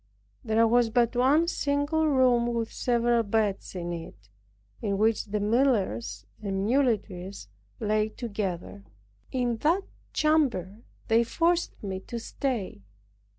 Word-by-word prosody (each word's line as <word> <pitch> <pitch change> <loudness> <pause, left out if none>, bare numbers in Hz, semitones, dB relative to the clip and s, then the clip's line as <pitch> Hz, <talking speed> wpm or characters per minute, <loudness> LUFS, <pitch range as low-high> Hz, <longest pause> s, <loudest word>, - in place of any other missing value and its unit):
There 225 -1 +3
was 240 0 +3
but 235 +1 +2
one 280 +7 +4
single 290 0 0
room 250 -4 +3
with 230 -1 -2
several 240 -1 +2
beds 205 -3 -1
in 175 -1 -3
it, 105 - -9 0.5
in 200 -3 -1
which 220 +2 +2
the 210 0 -2
millers 205 - +1 0.2
and 195 -1 -2
muleteers 205 - 0 0.3
lay 215 0 +1
together. 200 - -5 0.5
In 245 -3 0
that 335 - +2 0.3
chamber 240 - +1 0.3
they 230 +1 +4
forced 335 +6 0
me 190 -2 -3
to 235 +5 -7
stay. 230 - -3
225 Hz, 120 wpm, -27 LUFS, 200-255 Hz, 0.5 s, one